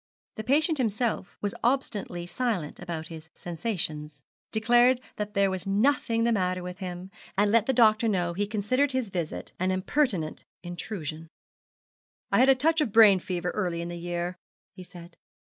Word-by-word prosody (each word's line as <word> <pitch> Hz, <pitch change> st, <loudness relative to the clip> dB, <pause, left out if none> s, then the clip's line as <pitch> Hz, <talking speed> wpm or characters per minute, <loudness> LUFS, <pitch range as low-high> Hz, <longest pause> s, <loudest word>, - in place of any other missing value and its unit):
The 215 Hz, -, -4 dB
patient 300 Hz, +5 st, +2 dB
himself 220 Hz, -3 st, -1 dB
was 205 Hz, -1 st, -1 dB
obstinately 215 Hz, -8 st, -1 dB
silent 180 Hz, -4 st, -2 dB
about 170 Hz, -2 st, -5 dB
his 160 Hz, -1 st, -10 dB
sensations, 160 Hz, -6 st, -4 dB, 0.3 s
declared 240 Hz, +3 st, +4 dB, 0.2 s
that 210 Hz, 0 st, -4 dB
there 200 Hz, -1 st, +3 dB
was 190 Hz, 0 st, -4 dB
nothing 230 Hz, +2 st, +2 dB
the 235 Hz, -, +2 dB
matter 185 Hz, -4 st, 0 dB
with 180 Hz, +1 st, -7 dB
him, 180 Hz, 0 st, -6 dB, 0.3 s
and 205 Hz, +1 st, +3 dB
let 230 Hz, -1 st, +3 dB
the -, -, +4 dB
doctor 225 Hz, -2 st, +4 dB
know 175 Hz, -5 st, 0 dB
he 205 Hz, +3 st, -1 dB
considered 255 Hz, +7 st, 0 dB
his 255 Hz, -6 st, -2 dB
visit 170 Hz, -4 st, -4 dB
an 185 Hz, +1 st, +1 dB
impertinent 185 Hz, -, 0 dB, 0.2 s
intrusion. 170 Hz, -2 st, -6 dB, 1.0 s
'I -, -, +4 dB
had 260 Hz, -, +6 dB
a 270 Hz, -, +7 dB
touch 315 Hz, +5 st, +2 dB
of 255 Hz, -, 0 dB
brain 210 Hz, -3 st, +7 dB
fever 180 Hz, -1 st, -3 dB
early 180 Hz, -5 st, -2 dB
in 170 Hz, 0 st, -4 dB
the 175 Hz, -, -5 dB
year,' 175 Hz, +1 st, -3 dB, 0.3 s
he 190 Hz, -, -11 dB
said. 175 Hz, -1 st, -12 dB
195 Hz, 165 wpm, -27 LUFS, 175-230 Hz, 1.0 s, a